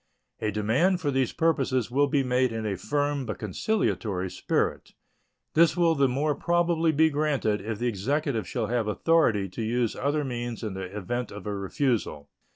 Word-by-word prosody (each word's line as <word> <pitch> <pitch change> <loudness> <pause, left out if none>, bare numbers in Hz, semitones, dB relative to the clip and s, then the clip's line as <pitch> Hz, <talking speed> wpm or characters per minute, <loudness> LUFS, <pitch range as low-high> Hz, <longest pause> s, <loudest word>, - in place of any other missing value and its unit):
A 110 - -1
demand 115 - +2
for 145 -3 -1
these 130 -2 +1
purposes 130 -7 +1
will 145 +3 +3
be 140 -1 +1
made 125 -1 +1
in 110 -1 -4
a 100 -2 -1
firm 145 +8 -1
but 110 -4 -5
conciliatory 105 - -1
spirit. - - -1 0.6
This 165 +1 +4
will 170 -2 +4
the 140 -3 +3
more 145 +4 0
probably 170 0 +1
be 160 +1 +3
granted 140 -8 0
if 110 +1 -4
the 120 - -3
Executive 120 +3 -1
shall 120 -3 -2
have 115 -1 -1
authority 110 -4 +2
to 95 - -6
use 115 +1 0
other 145 +2 0
means 120 -3 -4
in 105 -3 -3
the 95 0 -5
event 120 +4 -3
of 105 - -9
a 105 - -2
refusal. 100 - -1
125 Hz, 175 wpm, -27 LUFS, 105-150 Hz, 0.6 s, This